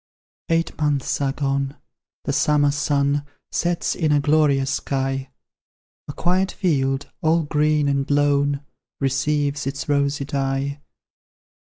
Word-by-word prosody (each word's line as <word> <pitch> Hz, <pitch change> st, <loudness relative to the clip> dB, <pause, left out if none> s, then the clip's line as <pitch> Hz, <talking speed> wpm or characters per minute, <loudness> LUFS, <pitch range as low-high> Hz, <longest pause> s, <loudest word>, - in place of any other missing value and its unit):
Eight 165 Hz, 0 st, +1 dB
months 145 Hz, -2 st, 0 dB
are 135 Hz, -1 st, +1 dB
gone, 140 Hz, 0 st, -1 dB, 0.5 s
the -, -, -1 dB
summer 145 Hz, -1 st, +3 dB
sun 145 Hz, 0 st, +1 dB, 0.3 s
Sets 175 Hz, 0 st, 0 dB
in 155 Hz, -3 st, 0 dB
a 145 Hz, -, +4 dB
glorious 140 Hz, -2 st, +3 dB
sky; 135 Hz, -1 st, -2 dB, 0.8 s
A 145 Hz, -, -5 dB
quiet 185 Hz, +4 st, +1 dB
field, 135 Hz, -7 st, 0 dB
all 160 Hz, +1 st, +3 dB
green 150 Hz, 0 st, +2 dB
and 140 Hz, -1 st, 0 dB
lone, 145 Hz, 0 st, +2 dB, 0.4 s
Receives 140 Hz, +1 st, 0 dB
its 140 Hz, +2 st, -4 dB
rosy 140 Hz, -1 st, +1 dB
dye. 140 Hz, 0 st, -2 dB
145 Hz, 120 wpm, -22 LUFS, 140-150 Hz, 0.8 s, a